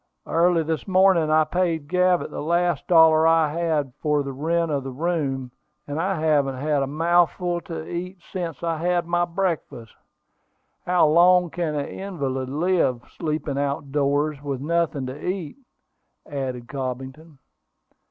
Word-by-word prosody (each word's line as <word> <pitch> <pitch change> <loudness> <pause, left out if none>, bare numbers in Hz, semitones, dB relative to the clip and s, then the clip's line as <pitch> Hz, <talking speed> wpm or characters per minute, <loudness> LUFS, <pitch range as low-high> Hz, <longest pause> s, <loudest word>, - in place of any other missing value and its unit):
"Early 170 0 +2
this 160 +3 -3
morning 185 -4 +4
I 155 0 +4
paid 165 -2 -1
Gavett 180 +1 +2
the - - -5
last 170 0 0
dollar 160 -2 +6
I 165 -2 +4
had 155 -6 -1
for 150 -2 +1
the 140 -1 -5
rent 165 +4 0
of 140 -2 -1
the 135 - -5
room; 135 -4 -2 0.3
and 145 +2 -3
I 190 -1 -1
haven't 145 -4 +2
had 145 +1 0
a 135 - -1
mouthful 175 +3 +1
to 165 -2 -7
eat 180 +2 -5 0.2
since 170 -5 -4
I 165 -1 -1
had 175 +1 0
my 175 +1 +1
breakfast. 165 -10 -3 0.9
How 180 -2 +4
long 175 +2 +5
can 160 -1 -2
an 145 -1 -1
invalid 135 -9 -4
live, 145 -5 +1
sleeping 155 -3 -2
out 140 0 -2
doors, 145 0 0
with 140 -3 -4
nothing 155 -2 -1
to 130 +3 -7
eat?" 180 - -4 0.7
added 130 -4 -4
Cobbington. 135 +4 -6
160 Hz, 150 wpm, -23 LUFS, 140-175 Hz, 0.9 s, dollar